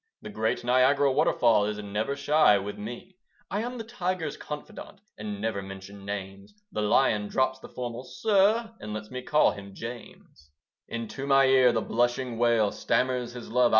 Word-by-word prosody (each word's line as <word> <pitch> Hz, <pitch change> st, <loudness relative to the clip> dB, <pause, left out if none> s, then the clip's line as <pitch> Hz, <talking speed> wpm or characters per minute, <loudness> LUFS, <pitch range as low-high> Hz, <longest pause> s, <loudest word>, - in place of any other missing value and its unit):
The 215 Hz, -, -7 dB
great 110 Hz, -, -1 dB
Niagara 130 Hz, +3 st, +4 dB
waterfall 115 Hz, -4 st, +3 dB
Is 105 Hz, 0 st, -2 dB
never 105 Hz, +6 st, -2 dB
shy 145 Hz, -5 st, +4 dB
with 100 Hz, +1 st, -5 dB
me. 120 Hz, -, -8 dB, 0.3 s
I 205 Hz, +3 st, 0 dB
am 245 Hz, +2 st, -4 dB
the 225 Hz, -, -5 dB
tiger's 185 Hz, -9 st, -3 dB
confidant, 200 Hz, +6 st, -8 dB, 0.2 s
And 105 Hz, -1 st, -5 dB
never 110 Hz, -2 st, -2 dB
mention 95 Hz, +1 st, -10 dB
names: 100 Hz, -, -6 dB, 0.2 s
The 105 Hz, -, -2 dB
lion 105 Hz, 0 st, +2 dB
drops 130 Hz, +4 st, 0 dB
the -, -, -11 dB
formal 120 Hz, 0 st, -5 dB
"Sir," 220 Hz, -, +2 dB
And 105 Hz, 0 st, -6 dB
lets 110 Hz, +1 st, -7 dB
me 130 Hz, 0 st, -5 dB
call 150 Hz, +4 st, +3 dB
him 100 Hz, -1 st, -10 dB
James. 115 Hz, -10 st, -10 dB, 0.4 s
Into 115 Hz, +4 st, -5 dB
my 135 Hz, -1 st, +5 dB
ear 130 Hz, -2 st, +5 dB
the 115 Hz, -, 0 dB
blushing 120 Hz, +1 st, 0 dB
Whale 115 Hz, -3 st, +3 dB
Stammers 125 Hz, -1 st, 0 dB
his 125 Hz, -1 st, -8 dB
love. 125 Hz, 0 st, +4 dB
120 Hz, 170 wpm, -27 LUFS, 105-140 Hz, 0.4 s, my